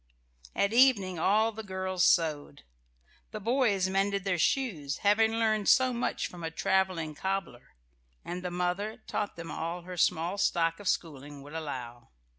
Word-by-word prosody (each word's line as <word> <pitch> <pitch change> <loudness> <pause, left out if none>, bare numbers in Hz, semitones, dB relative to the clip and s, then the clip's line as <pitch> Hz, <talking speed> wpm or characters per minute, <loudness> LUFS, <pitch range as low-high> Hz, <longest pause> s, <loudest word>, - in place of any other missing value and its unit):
At 200 +2 +1
evening 215 -9 +4
all 215 +6 +3
the 220 0 -7
girls 190 -2 -2
sewed; 150 -5 +1 0.7
the 215 - -6
boys 220 -4 +1
mended 195 +1 0
their 185 -3 -1
shoes, 160 - 0
having 220 +2 +4
learned 220 -2 +1
so 255 0 +5
much 240 - -2
from 175 -1 -8
a 165 - -2
travelling 180 -2 0
cobbler; 190 -5 -4 0.5
and 180 +1 -5
the 180 - -3
mother 180 +5 -2
taught 205 - -3
them 170 -1 -7
all 170 +2 -4
her 180 0 -8
small 175 +3 +1
stock 165 -3 +1
of 205 - -7
schooling 145 -4 -3
would 145 +2 -12
allow. 125 -7 -6
185 Hz, 155 wpm, -29 LUFS, 165-205 Hz, 0.7 s, so